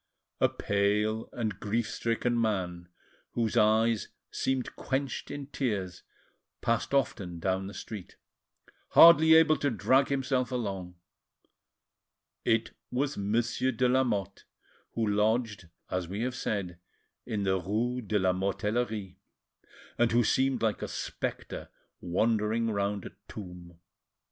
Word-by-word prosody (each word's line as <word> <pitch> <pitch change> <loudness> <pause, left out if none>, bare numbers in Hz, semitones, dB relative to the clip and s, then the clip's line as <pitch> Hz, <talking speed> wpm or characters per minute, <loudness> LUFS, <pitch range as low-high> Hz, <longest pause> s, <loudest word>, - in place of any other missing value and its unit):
A - - +4
pale 105 +2 0
and 110 -5 -3
grief 110 +2 -1
stricken 120 +1 0
man, 90 -5 -2 0.4
whose 115 -1 0
eyes 110 0 +3 0.2
seemed 130 -1 -1
quenched 135 -1 -3
in 145 -1 -5
tears, 105 -10 -3 0.6
passed 115 0 0
often 100 -10 0
down 95 +3 -1
the 100 - -8
street, 105 -5 -8 0.8
hardly 160 -1 +9
able 160 -1 +6
to 145 - +1
drag 130 +3 +3
himself 130 -2 0
along; 95 -7 -3 1.5
it 115 -1 +1 0.2
was 140 +3 -1
Monsieur 115 +5 0
de 125 +1 +1
Lamotte, 125 -7 0 0.5
who 115 - 0
lodged, 105 -2 0 0.2
as 90 -2 -1
we 100 +5 -4
have 125 +1 -1
said, 100 -7 -3 0.5
in 105 -2 -2
the 95 -1 +1
rue 115 +7 -1
de 105 -1 0
la 95 -2 +2
Mortellerie, 105 +1 -2 0.8
and 120 -1 +4
who 120 +1 +4
seemed 130 +2 +1
like 110 -3 0
a - - -3
spectre - - -5 0.3
wandering 110 +5 +1
round 100 -1 -1
a - - -7 0.2
tomb. 90 -4 -10
110 Hz, 125 wpm, -29 LUFS, 100-125 Hz, 1.5 s, hardly